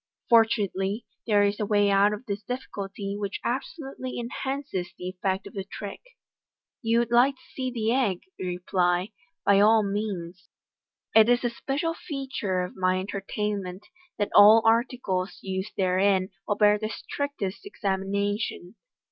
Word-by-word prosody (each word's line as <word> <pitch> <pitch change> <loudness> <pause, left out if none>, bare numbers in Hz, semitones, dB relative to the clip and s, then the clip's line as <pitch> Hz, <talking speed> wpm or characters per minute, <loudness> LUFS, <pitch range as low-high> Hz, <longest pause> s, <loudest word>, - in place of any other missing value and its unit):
For 230 -1 +8
tunately, 200 -1 -2 0.2
there 205 -2 +4
is 200 0 +1
a 210 - 0
way 205 -1 +3
out 200 +1 +5
of 210 +4 -5
the 200 -4 -2
difficulty 200 -5 -5
which 200 -1 -3
absolutely 265 0 -4
enhances 265 -5 -4
the 180 - -5
effect 190 +1 -2
of 200 - -10
the 195 - -4
trick. 200 +1 -8 0.4
" - - -67
You 230 -1 +2
would 235 0 +1
like 250 +3 +5
to - - -25
see 260 -1 -2
the 230 -2 0
egg," 220 -9 +1 0.2
you 185 - -3
reply 180 0 +1
j - - -45 0.2
" 330 - -61
by 200 0 +5
all 215 +1 +6
means. 195 -4 -4 0.6
It 220 +1 +7
is 245 +1 +3
a 240 - +1
special 295 +6 -2
feature 265 - -3
of 180 - -7
my 185 0 +1
entertainment 200 -1 -4 0.3
that 205 - -1
all 215 +2 +8
articles 225 -5 +1
used 190 +2 -4
therein 190 0 +2 0.2
will 205 - +1
bear 210 0 +4
the 215 0 -3
strictest 255 - -4
examination. 200 - -2
205 Hz, 160 wpm, -26 LUFS, 190-235 Hz, 0.6 s, For